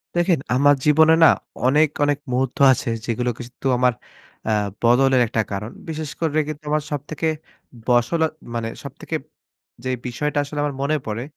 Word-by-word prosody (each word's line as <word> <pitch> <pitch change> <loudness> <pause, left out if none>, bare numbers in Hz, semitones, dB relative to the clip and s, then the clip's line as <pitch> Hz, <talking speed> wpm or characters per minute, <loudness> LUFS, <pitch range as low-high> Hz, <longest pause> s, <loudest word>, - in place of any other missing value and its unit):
দেখেন 175 -3 +2 0.2
আমার 145 +2 +5
জীবনে 160 +2 +6
না - - +10 0.4
অনেক, 150 +4 +4 0.2
অনেক 145 0 +1
মুহূর্ত 125 0 -1
আছে 125 - -1 0.2
যেগুলো 120 +1 -1
কিন্তু 125 +2 -6
আমার 125 -1 +3 0.5
আ 110 - +1 0.3
বদলের 125 +2 +4
একটা 110 0 0
কারণ। 105 +3 -4 0.2
বিশেষ 155 -2 -4
করে 155 -2 +1
কিন্তু 150 0 -7
আমার 150 -1 +1
সবথেকে 150 +3 -3 0.6
বসল 125 +7 +2 0.3
মানে 115 -1 -2
সবথেকে - - -6 0.7
যে, 130 - -3 0.2
বিষয়টা 145 +4 -2
আসলে 145 +1 -6
আমার 145 -2 -2
মনে 150 +2 +1
পড়ে, 110 +2 -3
140 Hz, 155 wpm, -22 LUFS, 125-150 Hz, 0.7 s, না